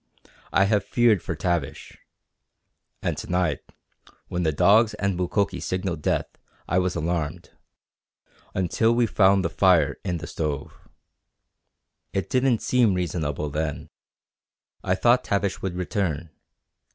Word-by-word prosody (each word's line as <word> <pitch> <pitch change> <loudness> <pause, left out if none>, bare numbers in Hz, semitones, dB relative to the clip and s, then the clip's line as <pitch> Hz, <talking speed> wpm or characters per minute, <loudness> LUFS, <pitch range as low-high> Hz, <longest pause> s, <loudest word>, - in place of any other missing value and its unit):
I 95 - +4
have 105 +1 +2
feared 115 -6 +3
for 85 - -4
Tavish. 85 -3 -3 1.1
And - - 0
to - - -8
night 90 -6 +1 0.7
when 90 - -2
the 80 -2 +2
dogs 105 +8 +4
and 100 -1 -1
Mukoki 90 +1 -1
signalled 90 -4 -3
death - - 0 0.4
I 90 - +2
was 90 -1 -1
alarmed 80 -2 -3 1.0
until 110 +6 +2
we 120 0 +3
found 95 -3 +3
the - - +1
fire 85 -7 +3
in 90 -3 -2
the 80 - -7
stove. 75 -5 -4 1.4
It 95 0 -2
didn't 130 -3 +2
seem 120 -6 +3
reasonable 75 -4 -2
then. 75 0 -3 0.9
I - - +1
thought 120 +1 +3
Tavish 100 -1 -1
would 95 -2 -3
return. 90 -4 -2
90 Hz, 125 wpm, -24 LUFS, 80-100 Hz, 1.4 s, I